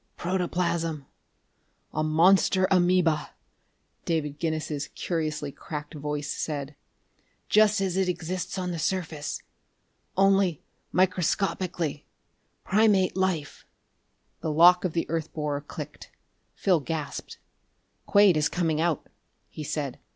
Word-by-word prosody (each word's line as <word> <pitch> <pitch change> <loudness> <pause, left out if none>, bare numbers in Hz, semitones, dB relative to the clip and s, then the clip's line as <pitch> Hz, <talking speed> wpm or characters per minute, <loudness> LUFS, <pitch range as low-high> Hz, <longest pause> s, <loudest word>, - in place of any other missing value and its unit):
"Protoplasm 170 -4 -1 0.9
a 155 - 0
monster 185 +4 +4
amoeba," 175 -4 +2 0.7
David 150 -3 -2
Guinness's 155 -3 -2
curiously 155 -4 -2
cracked 150 +1 -7
voice 150 -1 -4
said. 145 -2 -4 0.7
"Just 215 0 +5
as 190 -2 0
it 190 -1 +1
exists 180 +2 -3
on 180 -1 -2
the 170 - -4
surface, 160 -3 -2 0.7
only 195 -4 +3 0.3
microscopically. 180 -3 0 0.6
Primate 195 -3 +3
life...." 185 -6 -1 0.8
The 160 - -3
lock 175 +3 +6
of 175 - -1
the 165 - -1
earth 160 -1 -2
borer 150 -2 -2
clicked. 150 0 -9 0.5
Phil 185 -4 +2
gasped. 155 0 -5 0.7
"Quade 200 -5 +6
is 155 - +2
coming 165 -3 0
out!" 165 -3 0 0.4
he 155 - -7
said. 140 -3 -3
165 Hz, 105 wpm, -27 LUFS, 150-185 Hz, 0.9 s, lock